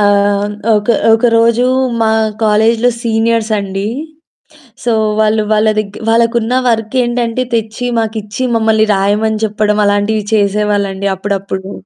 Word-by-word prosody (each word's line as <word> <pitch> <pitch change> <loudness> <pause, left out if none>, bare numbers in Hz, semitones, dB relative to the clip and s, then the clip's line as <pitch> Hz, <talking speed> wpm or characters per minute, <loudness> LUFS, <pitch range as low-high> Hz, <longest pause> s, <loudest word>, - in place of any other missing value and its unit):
ఆహ్, 205 0 +2 0.3
ఒక 210 +1 -1 0.3
ఒక 225 +2 +2
రోజు 230 +1 +3 0.4
మా 220 -1 +2 0.3
కాలేజ్‌లో 225 +3 +2
సీనియర్స్ 225 -1 0
అండి. 195 0 -4 1.0
సో, 240 - 0 0.3
వాళ్ళు 215 0 +2
వాళ్ళదగ్ 215 -1 0
వాళ్ళకున్న 230 +1 +1 0.2
వర్కేంటంటే 240 +1 -1
తెచ్చి 225 +2 -3
మాకిచ్చి 220 +1 -4
మమ్మల్ని 220 -1 +2
రాయమని 210 +3 0
చెప్పడం, 210 0 0
అలాంటివి 205 +1 0
చేసేవాళ్ళండి 200 -1 0
అప్పుడప్పుడు. 195 0 -4
215 Hz, 105 wpm, -13 LUFS, 205-225 Hz, 1.0 s, రోజు